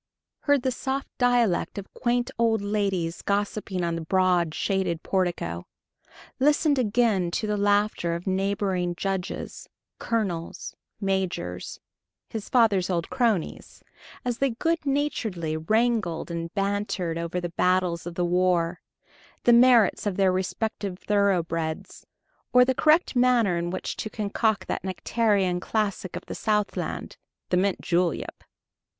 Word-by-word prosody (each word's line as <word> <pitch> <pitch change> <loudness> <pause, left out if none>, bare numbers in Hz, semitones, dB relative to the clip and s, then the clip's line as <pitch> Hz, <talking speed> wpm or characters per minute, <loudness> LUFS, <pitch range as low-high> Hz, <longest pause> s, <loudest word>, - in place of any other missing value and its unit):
heard 285 -3 +2
the 260 - +1
soft 265 +2 -3
dialect 245 -8 +2
of 200 - -7
quaint 245 +1 0
old 225 -1 +3
ladies 195 -5 -1
gossiping 200 -2 -1
on 170 -1 0
the 165 - -3
broad, 180 -1 +2
shaded 185 -1 -1
portico... 170 - -1 0.7
listened 290 +1 +3
again 215 -5 +2
to 215 +6 -2
the 210 0 0
laughter 205 -4 +1
of 170 - -6
neighboring 190 -2 0
judges, 190 0 -4 0.3
colonels, 190 -8 -3 0.2
majors 190 - -2 0.5
his 220 -2 -5
father's 210 -7 +3
old 170 +1 -2
cronies 235 -9 -1 0.4
as 245 -1 -2
they 275 - +2
good 325 +8 -1
naturedly 220 - -1
wrangled 215 0 0
and 170 0 -4
bantered 195 -4 -1
over 170 +2 -2
the 175 -1 -4
battles 180 -1 +1
of 170 - -6
the 175 - 0
War, 175 -1 +1 0.6
the 240 - +6
merits 235 -4 +5
of 195 - -2
their 190 -2 +4
respective 190 +1 -2
thoroughbreds, 170 -6 -1 0.4
or 250 0 +6
the 260 - +2
correct 310 +3 +3
manner 245 -6 +3
in 170 0 -2
which 185 - -4
to 215 - -4
concoct 215 0 -1
that - - -3
nectarian 190 -1 +1
classic 200 -2 -2
of - - -6
the - - -6
Southland, 210 -2 -2 0.3
the 180 - +2
mint 195 +1 +1
julep! 175 -1 -1
195 Hz, 130 wpm, -26 LUFS, 175-225 Hz, 0.7 s, the